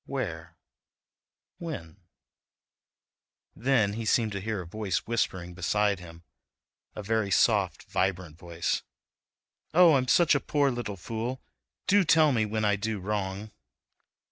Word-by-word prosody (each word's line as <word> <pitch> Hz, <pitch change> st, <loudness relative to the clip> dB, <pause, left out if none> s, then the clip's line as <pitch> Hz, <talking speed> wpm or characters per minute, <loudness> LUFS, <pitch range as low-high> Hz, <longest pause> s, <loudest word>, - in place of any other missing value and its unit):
Where—? 85 Hz, -11 st, -5 dB, 1.0 s
When—? 105 Hz, -, -7 dB, 1.6 s
Then 115 Hz, -5 st, +2 dB
he 115 Hz, +2 st, -4 dB
seemed 110 Hz, 0 st, +2 dB
to 100 Hz, -1 st, -4 dB
hear 110 Hz, -1 st, -3 dB
a -, -, -9 dB
voice 105 Hz, +2 st, -3 dB
whispering 95 Hz, -6 st, -2 dB
beside 100 Hz, +2 st, 0 dB
him, 85 Hz, -1 st, -12 dB, 0.7 s
a 105 Hz, -, -6 dB
very 110 Hz, -1 st, 0 dB
soft, 95 Hz, -, +2 dB
vibrant 90 Hz, -4 st, -2 dB
voice: 85 Hz, -1 st, -2 dB, 0.9 s
"Oh, 175 Hz, -2 st, +7 dB
I'm 130 Hz, -2 st, +2 dB
such 170 Hz, +4 st, +5 dB
a 145 Hz, -, +3 dB
poor 140 Hz, 0 st, +1 dB
little 120 Hz, -5 st, -4 dB
fool; 115 Hz, +7 st, -4 dB, 0.5 s
do 200 Hz, +1 st, +4 dB
tell 160 Hz, -2 st, +5 dB
me 110 Hz, -4 st, +1 dB
when 110 Hz, 0 st, -1 dB
I 105 Hz, 0 st, +2 dB
do 110 Hz, 0 st, -3 dB
wrong." 100 Hz, +1 st, -3 dB
105 Hz, 130 wpm, -28 LUFS, 95-125 Hz, 1.6 s, Oh